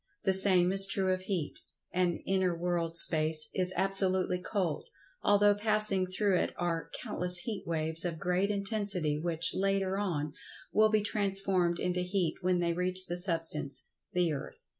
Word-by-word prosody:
The 190 - +1
same 185 -2 +5
is 195 0 +8
true 190 -1 -1
of 185 - -5
Heat, 185 -5 -5 0.3
and 180 -1 -1
inter 190 -2 -1
world 170 -1 -3
Space 155 -2 +6
is 185 -1 +1
absolutely 190 -2 0
cold, 185 - -4 0.4
although 205 0 +3
passing 210 -2 +1
through 190 0 -1
it - - -3
are 170 -2 -4
countless 180 0 +1
heat 195 +1 -5
waves 160 0 -1
of 170 -2 -4
great 180 +4 -2
intensity, 200 -7 -2
which, 165 0 -1
later 195 0 -2
on, 155 -7 -4 0.4
will 215 0 +3
be 215 -1 0
transformed 195 -4 -2
into 180 0 -2
Heat 180 -2 -2
when 180 0 0
they 170 -1 -1
reach 185 +1 +3
the 175 -1 -5
Substance, 160 -6 0 0.2
the 175 -3 -1
earth. 140 - -10
180 Hz, 160 wpm, -29 LUFS, 170-195 Hz, 0.4 s, is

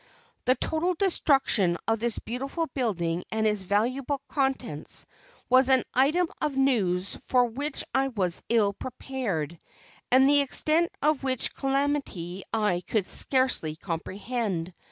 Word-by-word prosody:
The 255 +1 +4
total 340 +5 0
destruction 270 - +2
of 225 0 +1
this 235 0 -1
beautiful 270 +8 -3
building 180 -9 -1
and 220 0 0
its 210 -2 +1
valuable 245 +9 0
contents, 265 - -1 0.4
was 255 +1 +5
an 260 -1 +5
item 305 +8 +3
of 290 -3 -1
news 200 -9 +1
for 250 -1 +4
which 280 +5 -3
I 270 0 +2
was 190 -9 -1
ill 215 -4 +3
prepared, 200 - -4 0.5
and 260 +2 +6
the 285 0 +5
extent 310 +4 +2
of 300 -1 +2
which 260 -2 0
calamity 270 -10 -1
I 210 -6 +1
could 215 -4 0
scarcely 255 - +1
comprehend. 185 +2 -3
250 Hz, 130 wpm, -27 LUFS, 195-275 Hz, 0.5 s, and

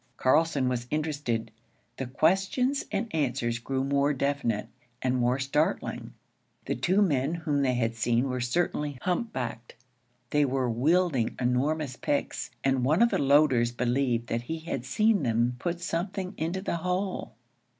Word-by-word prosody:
Carlson 140 0 +3
was 125 -1 -2
interested. 145 -7 -2 0.5
The 135 - -3
questions 190 - +1
and 215 +3 -2
answers 125 -6 0
grew 130 +2 -2
more 140 +1 +2
definite 135 -6 -1 0.3
and 130 0 0
more 125 +1 +2
startling. 140 +3 -1 0.5
The - - -1
two 185 +11 +2
men 145 -3 +1
whom 155 -4 -1
they 130 -2 +2
had 115 -1 0
seen 120 +3 +1
were 125 -1 -2
certainly 145 +1 -1
hump 215 +5 -1
backed. 120 -2 -5 0.6
They 150 0 +3
were 130 -2 0
wielding 145 0 +2
enormous 130 +2 0
picks, 140 -2 -2
and 135 -2 +2
one 155 - +4
of 235 - +4
the - - +1
loaders 135 -4 +4
believed 120 0 0
that 115 - -1
he 160 +7 -4
had 135 -6 -4
seen 215 +9 +2
them 120 -1 +1
put 175 +2 -2
something 185 +3 -3
into 175 +4 -3
the 170 - -1
hole. 180 - -2
140 Hz, 150 wpm, -28 LUFS, 125-165 Hz, 0.6 s, one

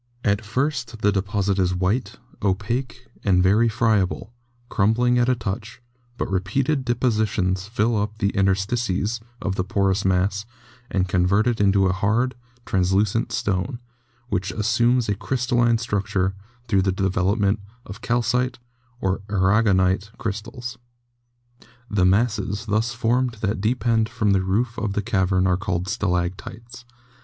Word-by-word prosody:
At 105 +1 +1
first, 125 0 -2
the 105 - +4
deposit 100 0 0
is 90 -1 +1
white, 95 +8 -1 0.3
opaque, 115 +6 -2 0.2
and 90 -2 +3
very 105 +5 +4
friable, 110 -1 0 0.3
crum 105 0 +2
bling 125 +1 +2
at 120 +1 +2
a 130 - +3
touch, 110 +1 -5 0.4
but - - -2
repeated 125 +10 0
depositions 110 -6 0
fill 115 +1 +1
up 105 +1 -2
the 100 -2 -1
inter 95 -1 +3
stices 105 +1 -1 0.2
of 100 - 0
the 90 - +1
porous 95 +1 +1
mass 95 +3 +1 0.4
and 95 -1 0
convert 90 +4 +2
it 120 -4 +1
into 100 -1 +4
a 95 - +2
hard, 110 +7 +1 0.3
translucent 95 +4 +1
stone, 100 +6 -1 0.5
which 95 -3 -1
assumes 115 +3 +2
a 105 - +1
crystalline 120 +1 +1
structure 100 -4 -1 0.3
through 100 -4 +3
the 95 0 +1
development 95 +2 +1 0.3
of 100 +3 -9
calcite 125 +2 0 0.4
or 95 0 0
aragonite 95 0 +2
crystals. 115 +3 -5 1.1
The 100 -3 +3
masses 105 +1 +1
thus 110 +2 0
formed 120 +2 +1
that 100 -1 -1
depend 115 0 +1
from 115 -4 0
the 95 -1 +3
roof 110 +6 -1
of 105 -3 -2
the 105 - -1
cavern 95 -3 +1
are 90 -1 +2
called 95 -2 -2
stalactites. 100 +4 -3
105 Hz, 140 wpm, -23 LUFS, 95-120 Hz, 1.1 s, the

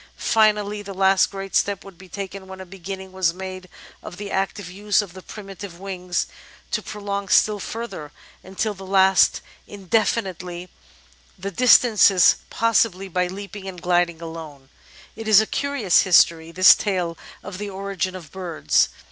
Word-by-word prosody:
Finally, 210 -2 +2
the 200 -1 -9
last 190 0 +3
great 195 -1 -7
step 200 -2 +1
would 195 -2 -12
be 185 +2 -16
taken 195 0 -7
when 190 0 -10
a 190 - -8
beginning 190 +1 -8
was 185 -3 0
made 185 -1 -8 0.3
of 175 - -10
the 200 0 -7
active 195 0 -2
use 200 +2 0
of 200 -5 -3
the 190 - -11
primitive 195 -3 -10
wings 180 -2 -3 0.5
to - - -1
prolong 200 -1 -5
still 210 +1 +3
further, 215 -9 -6 0.3
until 195 +3 -3
at 195 - -18
last 190 0 +3 0.3
indefinitely, 185 -3 -2 0.7
the 195 +2 -5
distances 215 -4 +5
possible 215 -4 +1
by 180 0 0
leaping 195 +1 -8
and 185 -2 -7
gliding 175 -2 +1
alone. 155 -5 -9 0.5
It 225 0 -8
is 215 -2 +7
a 220 - +2
curious 280 -8 +1
history, 165 -3 +3
this 185 +2 +8
tale 180 -5 -2 0.3
of 185 - -8
the 205 0 -5
origin 195 -1 -4
of 175 -4 -10
birds. 180 -4 0
190 Hz, 155 wpm, -22 LUFS, 180-205 Hz, 0.7 s, this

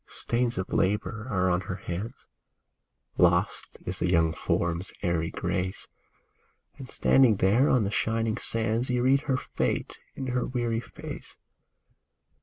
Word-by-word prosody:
MAUD - - -51
AND - - -13
MADGE - - -3
Stains 120 0 0
of 95 - -3
labor 105 +3 0
are 95 -5 +1
on 90 0 +1
her 95 +1 -5
hands, 100 +7 -6 0.9
Lost 90 +3 +2
is 90 0 -3
the - - +1
young 80 -2 +3
form's 85 +3 -1
airy 85 -3 0
grace; 95 +1 -3 0.9
And 130 - -8
standing 130 -5 +4
there 105 +9 +3
on 125 -4 +4
the 100 - -1
shining 115 +1 0
sands 115 +2 0
You 125 -1 +1
read 135 +2 +4
her 130 - +3
fate - - -2 0.2
in 135 - -4
her 125 - 0
weary 120 -3 -1
face. 120 - -9
110 Hz, 155 wpm, -27 LUFS, 90-120 Hz, 0.9 s, standing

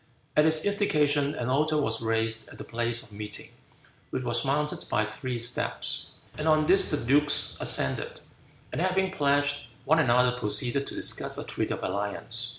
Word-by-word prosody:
At 150 - +5
his 160 -1 +4
instigation, 150 -8 +1
an 120 0 -3
altar 155 +4 +1
was 115 -6 0
raised 115 0 0
at - - -12
the - - -7
place 120 +1 -2
of 120 - -13
meeting, 105 0 -5 0.6
which 130 - -3
was 120 -1 0
mounted 150 +2 -1
by 110 - +1
three 120 +3 -5
steps, 120 +1 -1 0.3
and 155 - -2
on 155 -1 +4
this 190 +4 +4
the 150 - 0
dukes 145 +4 +2
ascended, 65 - +1 0.5
and - - -3
having 185 +1 +1
pledged 145 -4 +1 0.2
one 160 +4 +3
another 125 -3 +3
proceeded 125 +4 0
to - - -6
discuss - - -1
a - - -3
treaty - - -2
of - - -10
alliance. 105 +5 -3
135 Hz, 170 wpm, -27 LUFS, 115-150 Hz, 0.6 s, At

